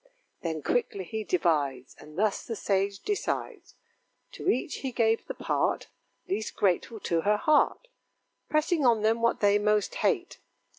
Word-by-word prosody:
Then 160 -3 -3
quickly 200 -5 0
he 220 +5 -4
divides, 145 -9 0
And 150 +1 -13
thus 210 0 +1
the 230 - -5
sage 195 -1 0
decides: 415 -1 -3 0.6
To - - -3
each 260 0 0
he 265 - -4
gave 225 -1 +1
the - - -5
part - - -1 0.4
Least 210 +3 -3
grateful 205 +4 0
to 165 -1 0
her 210 +4 +2
heart: 310 - +2 0.6
Pressing 305 +1 +1
on 230 -4 +4
them 225 +1 +2
what 235 0 +1
they 205 0 +4
most 210 0 +1
hate. 365 -6 0
210 Hz, 150 wpm, -28 LUFS, 190-245 Hz, 0.6 s, on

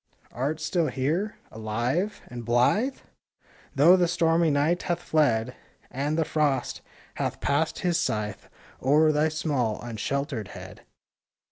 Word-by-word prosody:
Art 145 +6 -2
still 165 +1 0
here? 160 +12 -1 0.2
Alive? 120 - -2
and 120 -1 -8
blithe? 125 - +2 0.8
Though 155 +7 +7
the 180 -2 +3
stormy 165 -1 +2
Night 150 +4 +2
hath 175 - -1
fled, 125 -6 +1 0.4
And 145 +4 -1
the 160 - +2
Frost 150 -3 0 0.4
hath - - -2
passed 145 +3 0
his 175 -2 +1
scythe 105 -6 -3 0.3
O'er 150 +4 +4
thy 155 +1 +2
small, 140 -8 -1
unsheltered 120 - -3
head? - - -10
150 Hz, 125 wpm, -26 LUFS, 125-165 Hz, 0.8 s, Though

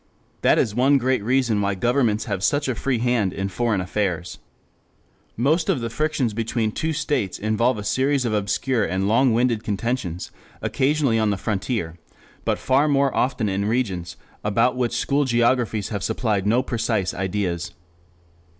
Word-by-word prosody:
That - - +4
is 105 - +1
one 135 +5 +4
great 130 -3 0
reason 120 -3 +1
why 100 0 0
governments 120 +1 +1
have 100 -5 -3
such 145 +6 +1
a 130 - 0
free 125 +2 -1
hand 115 -5 +1
in 95 0 -3
foreign 105 +1 0
affairs. 90 -2 -2 1.0
Most 155 - +1
of 175 -9 +2
the 115 -1 -4
frictions 150 -5 0
between 115 0 -1
two 160 +8 -2
states 140 - -1
involve 110 +3 +1
a 105 - -5
series 135 +4 +1
of 115 - 0
obscure 105 +4 0
and 95 +1 -1
long 120 +4 +4
winded 115 -1 +1
contentions, 100 -4 -3 0.3
occasionally 140 -4 +1
on 110 -1 +2
the 100 - 0
frontier, 95 -4 -3 0.5
but - - +1
far 135 +3 +2
more 140 -2 +2
often 125 -4 0
in 100 +1 -1
regions 105 -7 -2 0.3
about 115 +5 +2
which 120 -1 -1
school 140 +4 +1
geographies 120 -4 +1
have 100 -3 -3
supplied 105 -1 -1
no 120 +4 +3
precise 110 -6 -1
ideas. 90 -3 -2
115 Hz, 160 wpm, -23 LUFS, 100-130 Hz, 1.0 s, That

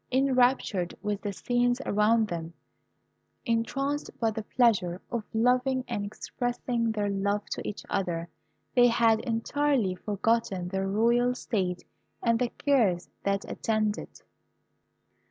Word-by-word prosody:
Enraptured 255 -8 +2
with 210 -1 -2
the 205 - -3
scenes 245 +4 +1
around 215 +2 +3
them, 170 -2 -5 0.9
entranced 275 +5 -1
by 225 -2 +2
the 220 +1 -4
pleasure 210 -6 +2
of 235 -2 -2
loving 250 +3 +2
and 225 -4 -2
expressing 235 +2 -2
their 210 -2 -1
love 200 +1 0
to - - -2
each 210 - -6
other, 175 -3 -2 0.5
they 245 -1 +6
had 230 -2 +4
entirely 240 -2 0
forgotten 205 -2 -1
their 190 +1 -1
royal 235 +5 +2
state 185 -8 -2 0.4
and 230 -1 +3
the 250 -1 +1
cares 225 - +1
that 200 0 -1
attend 215 -2 0
it. - - -12
225 Hz, 125 wpm, -28 LUFS, 200-245 Hz, 0.9 s, they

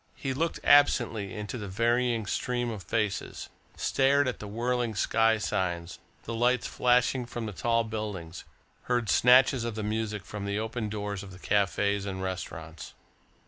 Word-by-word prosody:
He 135 -1 -3
looked 165 +5 -1
absently 115 -8 +4
into 105 +3 -5
the 105 - -5
varying 115 +3 +1
stream 120 +3 -1
of 105 -3 -6
faces, 100 +3 -2 0.3
stared 140 +1 +2
at 125 - -3
the 105 - -7
whirling 120 +1 -1
sky 115 +2 +3
signs, 90 -4 -2 0.2
the 115 - -5
lights 120 +2 +2
flashing 125 0 +2
from 120 -1 -5
the 105 - -4
tall 115 +4 +1
buildings, 105 -6 -5 0.4
heard 120 -5 0
snatches 125 0 +5
of 115 -2 -3
the 110 - -3
music 105 -1 -2
from 105 -1 -6
the 100 0 -2
open 110 0 -3
doors 105 -2 -4
of 100 -2 -10
the 90 - -11
cafes 100 +1 0
and 95 -1 -4
restaurants. 80 -4 -6
110 Hz, 160 wpm, -28 LUFS, 100-120 Hz, 0.4 s, snatches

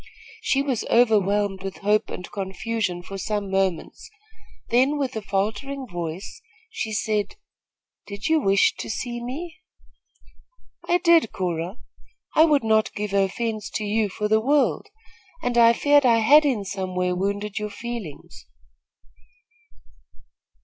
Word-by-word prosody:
She 275 -11 +1
was 260 -6 -1
overwhelmed 205 -4 +2
with 195 0 -6
hope 210 +1 +2
and 180 - -7
confusion 190 -1 -3
for 195 +2 -7
some 205 -1 -3
moments; 190 -3 -2 0.6
then, 260 +5 +3
with 265 -3 -2
a 220 - -3
faltering 215 +8 -2
voice, 175 - -6 0.3
she 335 - -4
asked: 215 - -1 0.7
"Did 200 +1 -8
you 320 0 +3
wish 195 -7 +3
to - - -6
see 240 +1 -4
me?" 325 +8 -6 1.3
"I 350 - +4
did, 335 - +4
Cora. 175 +2 -3 0.6
I 315 - +7
would 295 -5 +3
not 220 -1 +2
give 210 -1 -4
offence 215 +2 -1
to 215 - -1
you 210 0 0
for 210 +2 -2
the 220 +1 +3
world, 280 - +1 0.6
and 245 - -1
I 235 -1 +7
feared 290 +4 +4
I 235 -3 +5
had 290 +7 +6
in 235 -8 0
some 190 -1 -4
way 180 0 0
wounded 200 +2 -2
your 210 0 -4
feelings." 215 -7 -8
215 Hz, 135 wpm, -24 LUFS, 195-245 Hz, 1.3 s, I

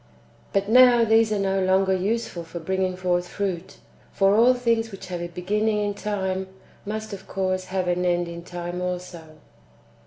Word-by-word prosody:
But 195 0 0
now 245 0 +6
these 225 0 +4
are 210 - +1
no 195 -1 0
longer 190 +1 +3
useful 195 -2 -2
for 165 +1 -9
bringing 185 +2 -1
forth 180 -1 0
fruit. 190 -3 -4 0.3
For 195 0 +3
all 240 +3 +5
things 230 -2 0
which 195 - -9
have 175 -1 -4
a 175 - -3
beginning 210 +5 -1
in 205 -1 -1
time 190 -2 -3 0.4
must 215 0 -4
of 190 -1 -9
course 185 -1 -1
have 185 -1 -2
an 180 0 0
end 175 -1 +1
in 170 0 -8
time 175 0 -5
also. 175 -3 -6
190 Hz, 175 wpm, -24 LUFS, 180-210 Hz, 0.4 s, now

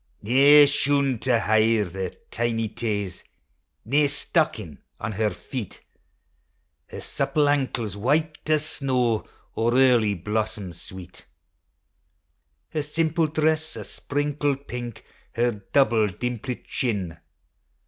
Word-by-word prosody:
Nae 140 +6 +7
shoon 140 -3 +1
to 125 -1 +2
hide 110 -3 +2
her 95 0 -3 0.2
tiny 115 -1 -1
taes, 100 -5 -3 0.6
Nae 145 +5 +3
stockin' 140 - -1 0.2
on 110 - -3
her 105 +1 0
feet; 120 -1 -7 1.0
Her - - -8
supple 150 -1 0
ankles 130 -8 0
white 155 +9 0
as 155 -1 +2
snaw, 125 -7 0 0.3
Or 115 +2 +1
early 120 -6 +4
blossoms 105 -2 -3
sweet. 90 0 -11 1.4
Her 155 - -2
simple 160 +2 0
dress 155 +1 0
o? - - -5
sprinkled 145 -1 -2
pink, 120 -2 -6 0.3
Her 115 -3 0
double, 115 -6 +4
dimplit 125 +5 -4
chin. 95 -9 -2
120 Hz, 105 wpm, -25 LUFS, 105-145 Hz, 1.4 s, Nae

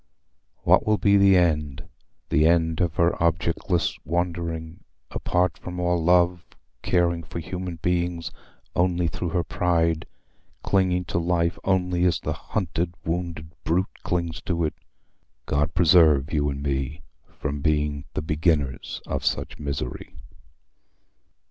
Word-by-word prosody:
What - - +5
will 110 0 +2
be 100 -1 +4
the 100 -1 +6
end, 75 -5 0 0.4
the 80 -1 +4
end 80 0 +2
of 85 -2 0
her 85 +1 +3
objectless 85 +1 0
wandering, 85 -1 -3 0.3
apart 90 -2 0
from 90 0 -6
all 90 -1 +1
love, 90 0 +3 0.4
caring 85 -2 +1
for 85 - -8
human 90 +1 -5
beings 85 -1 -1 0.4
only 90 -1 +2
through 85 +2 -3
her 85 +1 0
pride, 85 -2 0 0.6
clinging 90 -2 +1
to 85 - -1
life 85 0 0
only 90 -2 +1
as 90 - +2
the - - -3
hunted 85 -3 -3
wounded 85 -2 -3
brute 90 +4 -1
clings 85 -2 -2
to 85 -2 0
it? 75 - 0 0.7
God 75 +4 0
preserve 80 -5 +5
you 75 -1 +1
and 70 0 -4
me 70 +2 -2 0.3
from 70 -1 -3
being 75 -2 0
the - - -2
beginners 75 -4 -1
of - - -3
such - - -2
misery! 70 -4 -5
85 Hz, 130 wpm, -25 LUFS, 80-90 Hz, 0.7 s, the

